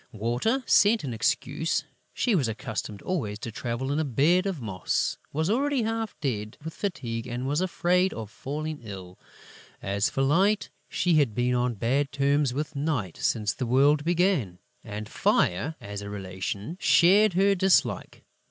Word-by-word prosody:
Water 120 - 0
sent 215 -1 +4
an 130 -4 -3
excuse: 140 +7 0 0.3
she 240 - 0
was 150 - +2
accustomed 110 -3 -5
always 125 - -2
to 115 +1 -6
travel 120 +4 -3
in 145 - 0
a - - +2
bed 155 - +2
of 190 -6 -3
moss, 95 -6 -1
was 160 +2 -1
already 265 +4 +1
half 225 -1 -3
dead 110 -7 -3
with 160 0 -6
fatigue 120 - -4
and 125 +2 -4
was 145 +5 0
afraid 180 0 +2
of 110 -2 -7
falling 155 +4 -5
ill. 95 -5 -9 0.6
As 100 +1 0
for 135 - -1
Light, 190 +9 +2 0.2
she 175 -3 +2
had 125 -8 +1
been 125 +1 +1
on 125 -1 0
bad 130 +6 0
terms 140 0 +2
with 150 +4 -4
Night 140 - -2
since 105 -3 0
the 125 - -4
world 140 +4 +4
began; 170 - +1 0.3
and 105 -1 -6
Fire, 120 - +1
as 100 0 -7
a 100 - -7
relation, 100 - -5
shared 200 +3 +5
her 195 +3 +4
dislike. 190 0 +1
140 Hz, 160 wpm, -27 LUFS, 110-175 Hz, 0.6 s, shared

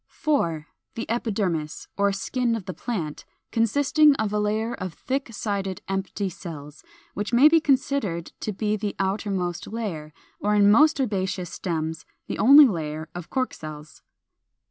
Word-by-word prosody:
4. 170 - -1 0.3
The 230 - -3
EPIDERMIS, 195 -10 -2
or 200 0 +2
skin 235 +4 -1
of 215 -5 -6
the 185 - -5
plant, 175 -12 -4 0.3
consisting 285 +6 +4
of 215 -4 -1
a 210 - +1
layer 215 +3 0
of 185 -5 -6
thick 265 -2 -3
sided 200 -4 -3
empty 195 +1 -2
cells, 160 -5 -9 0.3
which 205 +3 -3
may 250 +5 +7
be 330 +1 +5
considered 265 - 0
to 215 - -3
be 210 +1 -1
the 205 -1 -3
outermost 190 -3 -2
layer, 190 -9 -5 0.3
or 210 0 +1
in 205 0 +6
most 305 +7 +5
herbaceous 190 -7 -1
stems 160 -3 -3 0.2
the - - -5
only 285 +5 +9
layer, 155 - -3
of 175 -1 -8
cork 255 -1 -1
cells. 155 -1 -10
205 Hz, 150 wpm, -25 LUFS, 175-235 Hz, 0.3 s, only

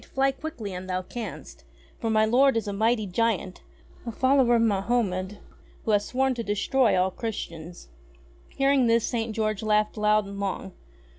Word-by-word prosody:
Fly 270 0 +3
quickly 270 -8 -7
an' 180 +1 -7
thou 185 0 -2
canst, 230 +4 -8 0.4
for 225 - -2
my 215 0 +3
lord 255 +3 +4
is 220 - -2
a 200 - -2
mighty 220 +2 +1
giant, 200 -1 -1 0.4
a 235 - -5
follower 260 0 +3
of 230 - +3
Mahomed, 200 -2 0 0.5
who 220 - +1
hath 205 -1 +4
sworn 265 +4 0
to 240 - -4
destroy 220 +2 +2
all 185 +1 +1
Christians." 175 -6 -6 0.6
Hearing 275 -2 +2
this 230 0 +3
St. 230 -1 -2
George 215 -1 -1
laughed 215 0 +1
loud 210 0 +3
and 200 0 -8
long. 195 - -3
220 Hz, 165 wpm, -26 LUFS, 200-240 Hz, 0.6 s, lord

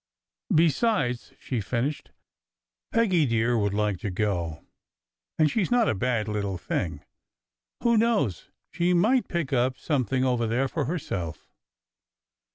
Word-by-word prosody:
"Besides," 155 - +2
she 125 -4 -3
finished, 125 +8 -2 0.8
"Peggy 190 -10 +3
dear 115 +1 +1
would 100 -3 0
like 105 -3 0
to 100 - -3
go, 90 -5 -2 0.7
and 155 -2 +3
she 225 - +1
s 180 - 0
not 240 -2 +3
a - - +2
bad 115 0 0
little 100 -3 -2
thing. 80 -3 -3 0.8
Who 235 -2 +4
knows 215 - +1 0.2
but - - -16
she 175 +1 +3
might 220 +6 +3
pick 170 -6 -2
up 125 0 +1
something 130 -3 0
over 120 -3 +1
there 125 +4 +1
for 145 +1 -2
herself? 90 - -4
125 Hz, 140 wpm, -26 LUFS, 105-170 Hz, 0.8 s, Who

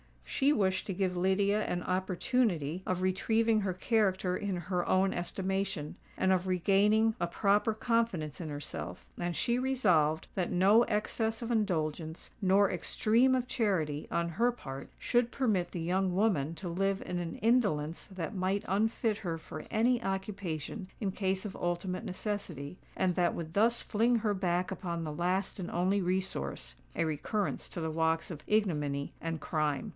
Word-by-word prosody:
She 275 - +2
wished 190 -8 +1
to 195 - -2
give 185 -1 0
Lydia 200 +3 +2
an 175 - -2
opportunity 185 - 0
of 185 0 0
retrieving 220 +4 +2
her 190 -2 -1
character 190 -3 +1
in 200 -1 -2
her 175 +1 -1
own 190 +1 +3
estimation, 190 -2 -2 0.2
and 190 - +2
of 185 0 +2
regaining 205 +5 +3
a 175 - 0
proper 205 +4 +2
confidence 220 - 0
in 160 - -4
herself; 145 0 -6
and 175 -1 -2
she 240 - +1
resolved 180 - +2
that 185 -2 -1
no 195 +5 +5
excess 220 +1 -1
of 235 - -3
indulgence, 160 -7 -1
nor 195 +1 +4
extreme 230 +8 +3
of 250 -1 0
charity, 165 - 0
on 170 0 0
her 230 +9 +2
part, 135 - -8
should 240 -1 +1
permit 210 -10 0
the 175 - -4
young 180 +2 +1
woman 170 -7 +1
to 185 - -6
live 195 +3 0
in 180 - -2
an 170 -1 -4
indolence 200 -10 +1
that 190 -1 -5
might 190 +1 -1
unfit 220 +2 +1
her 175 -7 -3
for 155 -1 -8
any 240 +2 +2
occupation 190 -3 -4
in 200 -4 -1
case 190 +1 -1
of 200 - -5
ultimate 175 +1 -2
necessity, 180 -6 -4 0.2
and 185 -1 +1
that 175 -1 +1
would 160 -1 -6
thus 230 +4 +3
fling 230 +3 +2
her 215 -2 +1
back 180 -1 0
upon 170 -3 -3
the 155 -2 -4
last 180 +5 -1
and 180 - -4
only 190 +3 +1
resource—a 180 - -3
recurrence 160 +7 -2
to - - -5
the 160 -1 -2
walks 160 +2 0
of 155 -2 -8
ignominy 150 -10 0
and 165 -1 -3
crime. 150 -3 -1
185 Hz, 160 wpm, -31 LUFS, 170-210 Hz, 0.2 s, no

